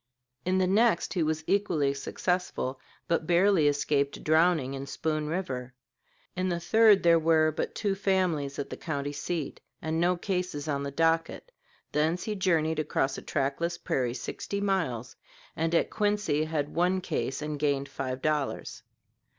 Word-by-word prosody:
In 185 Hz, +1 st, +2 dB
the 185 Hz, -, +3 dB
next 205 Hz, 0 st, +2 dB
he 180 Hz, -, 0 dB
was 155 Hz, 0 st, 0 dB
equally 160 Hz, -9 st, +1 dB
successful, 140 Hz, -2 st, -2 dB, 0.3 s
but 165 Hz, -1 st, 0 dB
barely 175 Hz, -2 st, +4 dB
escaped 140 Hz, -1 st, 0 dB
drowning 160 Hz, -4 st, +3 dB
in 135 Hz, 0 st, -5 dB
Spoon 155 Hz, 0 st, -2 dB
River. 130 Hz, -8 st, -4 dB, 0.6 s
In 185 Hz, +1 st, 0 dB
the 170 Hz, -1 st, -1 dB
third 215 Hz, +3 st, +5 dB
there 170 Hz, -1 st, +6 dB
were 160 Hz, -1 st, +3 dB
but 155 Hz, -, -3 dB
two 205 Hz, -3 st, 0 dB
families 185 Hz, -8 st, 0 dB
at 140 Hz, -, -4 dB
the -, -, -5 dB
county 145 Hz, -3 st, -3 dB
seat, 155 Hz, +1 st, -4 dB, 0.2 s
and 160 Hz, +1 st, -1 dB
no 180 Hz, +1 st, +2 dB
cases 180 Hz, -6 st, -3 dB
on 140 Hz, -2 st, -1 dB
the 140 Hz, -, -3 dB
docket. 165 Hz, -, 0 dB, 0.4 s
Thence 160 Hz, +4 st, +1 dB
he 215 Hz, -, -2 dB
journeyed 160 Hz, -5 st, +1 dB
across 140 Hz, -3 st, 0 dB
a -, -, -11 dB
trackless 155 Hz, +5 st, -1 dB
prairie 125 Hz, -2 st, -1 dB
sixty 200 Hz, +8 st, -4 dB
miles, 170 Hz, -, -1 dB, 0.4 s
and 165 Hz, +1 st, 0 dB
at -, -, +2 dB
Quincy 205 Hz, -8 st, +1 dB
had 150 Hz, -2 st, -2 dB
one 180 Hz, +2 st, +2 dB
case 150 Hz, -6 st, -2 dB
and 150 Hz, -1 st, -4 dB
gained 140 Hz, -2 st, 0 dB
five 130 Hz, -2 st, -5 dB
dollars. 150 Hz, -3 st, -1 dB
160 Hz, 160 wpm, -28 LUFS, 145-180 Hz, 0.6 s, there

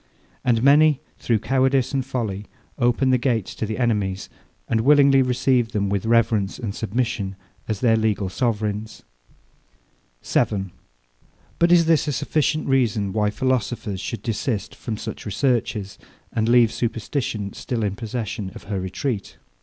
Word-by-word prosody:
And 120 Hz, -3 st, +2 dB
many, 145 Hz, +1 st, +5 dB, 0.2 s
through 115 Hz, -, +1 dB
cowardice 130 Hz, +3 st, +1 dB
and 135 Hz, -1 st, +1 dB
folly, 110 Hz, -6 st, -4 dB, 0.3 s
open 125 Hz, +2 st, +2 dB
the 130 Hz, -, +3 dB
gates 115 Hz, -6 st, 0 dB
to 110 Hz, -, -3 dB
the 110 Hz, -, -3 dB
enemies, 105 Hz, -6 st, -1 dB, 0.4 s
and 110 Hz, -, +1 dB
willingly 140 Hz, +1 st, +6 dB
receive 125 Hz, -2 st, +1 dB
them 100 Hz, -2 st, 0 dB
with 100 Hz, +1 st, -1 dB
reverence 115 Hz, -4 st, +2 dB
and 110 Hz, -5 st, -4 dB
submission, 110 Hz, -3 st, -2 dB, 0.3 s
as 110 Hz, -3 st, -3 dB
their 115 Hz, -3 st, +4 dB
legal 110 Hz, -3 st, 0 dB
sovereigns. 105 Hz, 0 st, -2 dB, 1.2 s
7. 95 Hz, -3 st, 0 dB, 0.9 s
But 170 Hz, +1 st, +4 dB
is 170 Hz, -1 st, +6 dB
this 160 Hz, -2 st, +3 dB
a 145 Hz, -, 0 dB
sufficient 155 Hz, +4 st, 0 dB
reason, 115 Hz, -7 st, +1 dB
why 105 Hz, -1 st, +2 dB
philosophers 120 Hz, -4 st, -1 dB
should 115 Hz, -, -5 dB
desist 115 Hz, -2 st, -2 dB
from 110 Hz, -2 st, -5 dB
such -, -, -6 dB
researches, 105 Hz, -4 st, -1 dB, 0.3 s
and 110 Hz, 0 st, +1 dB
leave 120 Hz, -2 st, +5 dB
superstition 115 Hz, -3 st, -2 dB
still 115 Hz, -3 st, -3 dB
in 100 Hz, -1 st, -1 dB
possession 110 Hz, -3 st, -4 dB
of -, -, -10 dB
her 100 Hz, -1 st, -3 dB
retreat? 100 Hz, +4 st, -4 dB
115 Hz, 145 wpm, -23 LUFS, 105-130 Hz, 1.2 s, willingly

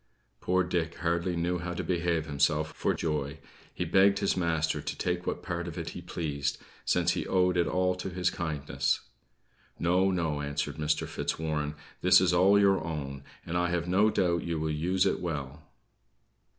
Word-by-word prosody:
Poor 95 Hz, +1 st, +2 dB
Dick 85 Hz, -2 st, -1 dB
hardly 85 Hz, +1 st, 0 dB
knew 85 Hz, +1 st, 0 dB
how 90 Hz, 0 st, -4 dB
to -, -, -3 dB
behave 85 Hz, -3 st, 0 dB
himself 75 Hz, +1 st, +1 dB
for -, -, 0 dB
joy. 75 Hz, -2 st, -2 dB, 0.3 s
He -, -, -3 dB
begged 100 Hz, +1 st, +4 dB
his 100 Hz, -, +1 dB
master 80 Hz, -3 st, 0 dB
to -, -, -5 dB
take 90 Hz, 0 st, -2 dB
what -, -, -2 dB
part 85 Hz, -1 st, -3 dB
of 85 Hz, -, -6 dB
it 85 Hz, -1 st, -4 dB
he 90 Hz, -, -7 dB
pleased, 75 Hz, -5 st, -2 dB, 0.3 s
since 90 Hz, 0 st, +2 dB
he -, -, -2 dB
owed 90 Hz, -1 st, +2 dB
it 85 Hz, -1 st, +2 dB
all 90 Hz, 0 st, +1 dB
to 90 Hz, -, -4 dB
his 90 Hz, -1 st, 0 dB
kindness. 70 Hz, -4 st, -1 dB, 0.8 s
"No, 90 Hz, +3 st, +3 dB
no," 80 Hz, -5 st, -1 dB
answered 75 Hz, 0 st, -3 dB
Mr. 75 Hz, 0 st, 0 dB
Fitzwarren, 75 Hz, -2 st, -2 dB, 0.3 s
"this -, -, +7 dB
is -, -, +2 dB
all 100 Hz, +2 st, +5 dB
your 100 Hz, -1 st, +4 dB
own; 70 Hz, -4 st, -5 dB, 0.2 s
and 85 Hz, -, -4 dB
I 90 Hz, 0 st, +2 dB
have 85 Hz, -1 st, -1 dB
no 100 Hz, +4 st, +4 dB
doubt 85 Hz, -5 st, +1 dB
you 85 Hz, -2 st, -2 dB
will 80 Hz, 0 st, -1 dB
use 90 Hz, +5 st, +1 dB
it -, -, +1 dB
well." 75 Hz, -4 st, -4 dB
85 Hz, 180 wpm, -29 LUFS, 75-90 Hz, 0.8 s, this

